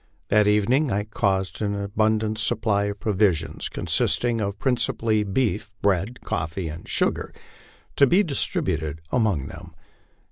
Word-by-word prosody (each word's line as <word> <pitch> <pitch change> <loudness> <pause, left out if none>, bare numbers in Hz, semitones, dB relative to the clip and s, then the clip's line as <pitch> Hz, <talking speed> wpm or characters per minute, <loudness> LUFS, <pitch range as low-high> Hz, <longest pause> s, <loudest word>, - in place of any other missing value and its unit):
That 105 0 +4
evening 120 +7 +2
I 100 +1 0
caused 95 -3 -1
an 100 -1 -1
abundant 110 +1 0
supply 110 -2 +1
of 100 0 -4
provisions, 95 -7 0
consisting 120 -2 0
principally 110 -1 0
of 100 -2 -4
beef, 115 -4 0
bread, 100 +5 0
coffee, 80 +2 -3
and 80 +2 -9
sugar, - - 0 0.7
to 140 - +6
be 185 +10 +4
dis 145 -8 +1
tributed 80 -1 -2
among 105 - +1
them. - - -10
105 Hz, 135 wpm, -24 LUFS, 95-115 Hz, 0.7 s, to